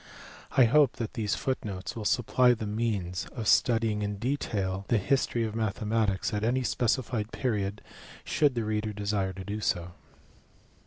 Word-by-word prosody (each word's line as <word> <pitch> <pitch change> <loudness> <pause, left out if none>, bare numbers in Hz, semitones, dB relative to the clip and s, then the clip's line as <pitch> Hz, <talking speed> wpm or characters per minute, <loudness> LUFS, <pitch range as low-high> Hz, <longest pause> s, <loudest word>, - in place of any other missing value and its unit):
I 130 - +8
hope 140 +2 +4
that 115 -2 -4
these 110 -5 -1
footnotes 105 -7 -3
will 110 -2 -5
supply 125 +2 +3
the 110 - -5
means 105 -5 -2
of 115 -4 -3
studying 115 -3 +3
in 105 0 -2
detail 100 -6 -2
the 120 - +3
history 120 +2 +1
of 110 -1 -3
mathematics 110 -1 0
at 105 0 -1
any 125 +3 +1
specified 120 -2 0
period 105 -5 -2 0.4
should 145 -4 +2
the 115 -2 -1
reader 105 0 -1
desire 100 -2 -1
to 95 +1 -7
do 105 +2 -4
so. 90 -4 -1
110 Hz, 155 wpm, -28 LUFS, 100-120 Hz, 0.4 s, I